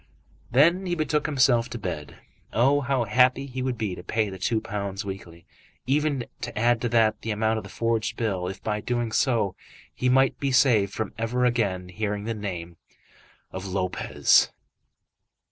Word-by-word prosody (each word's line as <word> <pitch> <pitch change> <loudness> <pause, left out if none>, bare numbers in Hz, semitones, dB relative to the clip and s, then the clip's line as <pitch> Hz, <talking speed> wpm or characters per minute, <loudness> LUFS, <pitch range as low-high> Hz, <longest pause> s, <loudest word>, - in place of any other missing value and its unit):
Then 170 +9 +4
he 175 - 0
betook 150 -1 0
himself 130 -5 +3
to 120 - -5
bed. 90 -8 -5 0.4
Oh, 135 +5 +3
how 135 -2 0
happy 125 +4 +3 0.2
would 130 -1 -1
he 110 -2 -2
be - - -4
to 90 - -8
pay 105 +2 -1
the 95 - -8
two 110 +4 +1
pounds 100 -1 -4
weekly, 85 -4 -8 0.4
even 140 -1 +1 0.2
to - - -5
add 120 +1 +2
to 120 - 0
that 110 -2 +2
the 115 - -5
amount 110 +1 +1
of - - -10
the - - -10
forged 115 -1 -1
bill, 95 -6 -1
if 95 0 -7
by 105 -1 -1
doing 120 -1 -1
so 110 -7 +1 0.4
he 125 - 0
might 135 +1 +3
be 140 -1 0
saved 115 -6 +4
from 110 -1 -4
ever 125 +2 0
again 100 -7 0
hearing 105 +1 -3
the 115 +2 -2
name 90 -5 -6 0.7
of 95 +1 -6
Lopez. 90 -1 +2
115 Hz, 175 wpm, -25 LUFS, 100-125 Hz, 0.7 s, Then